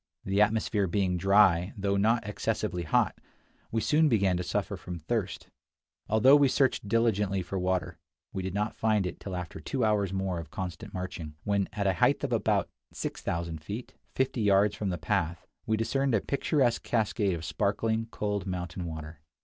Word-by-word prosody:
The 95 +1 +2
atmosphere 105 -2 +2
being 90 0 +1
dry, 95 -1 +4
though 100 0 0
not 110 +2 +2
excessively 90 -3 -2
hot, 75 - +1 0.5
we 115 - 0
soon 155 +4 +3
began 100 -6 +3
to 90 - -1
suffer 90 - -2
from 90 -1 -7
thirst. 90 +2 -3 0.6
Although 120 +6 +6
we 145 -1 +5
searched 130 -5 +1
diligently 105 -4 +1
for 95 +2 -4
water, 90 -1 -1 0.3
we 95 - -2
did 95 0 -4
not 105 +1 -1
find 110 -3 +1
it 90 - -5
till 95 -2 -6
after 90 -1 -5
two - - -1
hours 105 -3 +1
more 95 -2 -2
of 85 - -8
constant 95 0 -6
marching, 90 -5 -6
when 100 -1 0
at 105 -2 -2
a 95 - +3
height 85 - +2
of - - -1
about - - +1 0.2
6000 85 -1 -4
feet, 105 +9 -6 0.2
fifty 130 -2 0
yards 100 0 +4
from 105 - -2
the 90 - -2
path, 80 +2 -1 0.2
we 110 - +2
discerned 135 +3 +1
a 105 - +2
picturesque 140 -3 +1
cascade 105 -4 0
of 80 -1 -6
sparkling, 115 +5 0
cold 105 -3 -2
mountain 90 -1 -4
water. 80 -1 -7
100 Hz, 175 wpm, -29 LUFS, 90-110 Hz, 0.6 s, Although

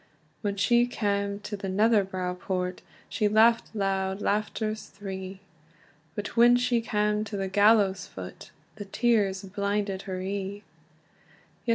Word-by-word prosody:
When 205 -2 -1
she 240 +4 +3
cam 200 -3 -1
to 205 - -5
the 195 -1 -5
Netherbow 190 -3 +1
Port, 180 -1 -3 0.3
She 210 - 0
laughed 225 +2 +4
loud 195 -1 -1
laughters 215 +1 -1
three; 190 -1 -7 0.7
But 205 -1 -5
when 240 +1 +7
she 245 -1 +2
cam 210 -1 0
to 205 -1 -5
the 195 0 -2
gallows 200 -1 +3
foot, 90 -1 -9 0.3
The 205 - -6
tears 200 -3 +1
blinded 200 0 -2
her 185 -1 -3
ee. 200 +2 -4
200 Hz, 130 wpm, -27 LUFS, 190-215 Hz, 0.7 s, when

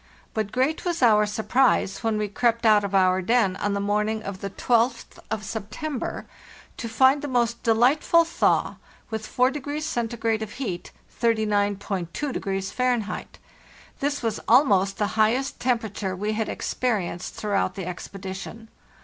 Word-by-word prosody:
But 215 -2 -2
great 260 +6 0
was 345 -6 -1
our 210 -3 +5
surprise 215 -1 +2
when 225 -1 +1
we 210 0 -1
crept 230 +3 0
out 210 -2 +6
of 200 -1 -2
our 185 -1 +4
den 200 -1 +2
on 205 0 -1
the - - -1
morning 210 +2 0
of 195 -2 -6
the 200 - -3
r2th 235 +5 0
of 215 0 -3
September 220 +7 -4 0.5
to 230 - -5
find 265 +5 +4
the 290 - -4
most 235 -3 0
delightful 260 +9 +4
thaw, 335 - +1 0.3
with 220 -1 -4
4° 285 +4 0 0.6
(C.) - - -3
of 210 - -8
heat 195 -10 -5 0.3
(30.2° 205 - -1
Fahr.). 245 -4 0 0.7
This 285 -1 -1
was 225 -2 -1
almost 200 -6 +4
the 210 - +1 0.2
highest 245 +5 +1
temperature 220 -6 -1
we 210 +3 -2
had 220 0 -2
experienced 200 -8 -2
throughout 200 -3 -1
the 190 - -5
expedition. 190 +4 -7
220 Hz, 140 wpm, -25 LUFS, 200-250 Hz, 0.7 s, out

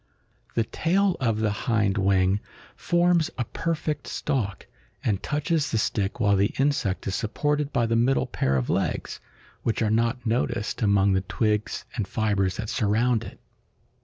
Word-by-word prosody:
The 115 - +3
tail 185 - +1
of 115 -4 0
the 110 -1 +2
hind 100 -2 0
wing 95 0 +3 0.4
forms 175 -1 +2
a 120 - -1
perfect 155 0 -3
stalk, 115 -10 -2 0.4
and 100 -3 0
touches 150 0 0
the 115 - 0
stick 105 0 -1
while 100 -3 +3
the 100 +1 +1
insect 135 -9 0
is 95 - -2
supported 145 +8 -1
by 120 -3 +2
the 115 0 +1
middle 125 +4 +2
pair 65 0 0
of 60 - -1
legs, - - -1 0.4
which 115 0 0
are 105 - +1
not 115 +3 +1
noticed 115 -1 -1
among 100 -2 +3
the 95 - +2
twigs 105 +2 -1
and 110 -6 -2
fibers 100 -4 0
that 110 -1 -4
surround 115 +2 +1
it. - - -10
115 Hz, 160 wpm, -25 LUFS, 100-135 Hz, 0.4 s, The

